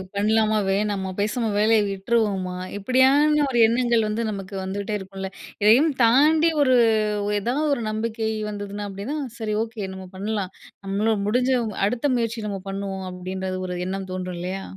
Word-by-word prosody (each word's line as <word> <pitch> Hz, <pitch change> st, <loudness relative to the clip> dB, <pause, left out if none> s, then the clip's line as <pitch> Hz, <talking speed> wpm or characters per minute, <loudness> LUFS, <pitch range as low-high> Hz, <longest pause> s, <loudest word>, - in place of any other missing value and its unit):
பண்ணலாமா 215 Hz, +1 st, +2 dB
வேணாமா, 195 Hz, -1 st, 0 dB
பேசாம 215 Hz, +2 st, 0 dB
வேலைய 220 Hz, 0 st, +4 dB
விட்டுருவோமா, 195 Hz, -2 st, 0 dB, 0.2 s
இப்பிடியான 270 Hz, +7 st, +4 dB
ஒரு 240 Hz, -, +1 dB
எண்ணங்கள் 235 Hz, -2 st, +2 dB
வந்து 215 Hz, +2 st, -1 dB
நமக்கு 195 Hz, 0 st, -6 dB
வந்துகிட்டே 200 Hz, +2 st, -3 dB
இருக்கும்ல. 190 Hz, 0 st, -7 dB, 0.3 s
இதையும் 250 Hz, +10 st, +6 dB
தாண்டி 305 Hz, +8 st, +5 dB
ஒரு, 255 Hz, -2 st, +4 dB, 0.5 s
ஒரு 210 Hz, -, 0 dB
ஏதாவது 270 Hz, +8 st, 0 dB
ஒரு 235 Hz, -, -4 dB
நம்பிக்கை 220 Hz, 0 st, -2 dB, 0.2 s
வந்ததுனா 205 Hz, 0 st, -5 dB
அப்பிடின்னா, 200 Hz, +10 st, -5 dB, 0.2 s
சரி. 215 Hz, -2 st, -2 dB
ஓகே. 225 Hz, -2 st, -6 dB
நம்ம 190 Hz, 0 st, -9 dB
பண்ணலாம், 200 Hz, -2 st, -3 dB, 0.3 s
நம்மளும் 205 Hz, +1 st, 0 dB
முடிஞ்சவங் 245 Hz, -1 st, +1 dB
அடுத்த 245 Hz, +5 st, -2 dB
முயற்சி 230 Hz, -2 st, -2 dB
நம்ம 195 Hz, -, -4 dB
பண்ணுவோம் 195 Hz, -1 st, -4 dB
அப்பிடின்ற 185 Hz, +1 st, -5 dB, 0.2 s
ஒரு 180 Hz, -, -4 dB
எண்ணம் 190 Hz, 0 st, -4 dB
தோன்றும் 185 Hz, -1 st, -4 dB
இல்லயா! 185 Hz, +2 st, -4 dB
210 Hz, 145 wpm, -23 LUFS, 195-235 Hz, 0.5 s, இதையும்